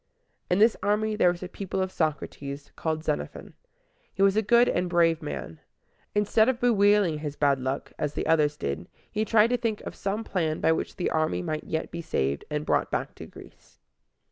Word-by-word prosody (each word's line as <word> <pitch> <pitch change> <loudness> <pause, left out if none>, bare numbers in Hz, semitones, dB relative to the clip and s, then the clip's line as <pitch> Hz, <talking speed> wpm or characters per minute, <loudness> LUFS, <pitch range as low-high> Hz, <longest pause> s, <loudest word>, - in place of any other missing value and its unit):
In 180 - +3
this 220 +2 +5
army 215 +1 +1
there 180 - +4
was 175 +1 -7
a - - -4
pupil 190 +1 -5
of 185 0 -1
Socrates, 145 -3 -3
called 160 -1 -2
Xenophon. 150 -2 -4 0.6
He 195 - 0
was 195 0 +4
a 220 - +3
good 235 +3 +5
and 180 0 0
brave 165 -1 +3
man. 80 - -6 0.6
Instead 210 +3 +3
of 250 -2 -1
bewailing 205 -8 +3
his 150 -1 -5
bad 140 -2 +2
luck, 130 +2 -3
as 150 -1 -2
the - - -2
others 150 -2 +2
did, 75 - -4 0.2
he 215 0 0
tried 220 +1 +4
to 245 - +3
think 225 -3 -2
of - - -7
some 200 +3 -3
plan 160 -7 -1
by - - +3
which 160 - -2
the 180 - -1
army 155 - 0
might 155 - -3
yet 160 0 -3
be 170 - -5
saved, 70 - -1
and 150 0 -2
brought - - +1
back - - -2
to - - -10
Greece. - - -16
170 Hz, 200 wpm, -27 LUFS, 150-210 Hz, 0.6 s, this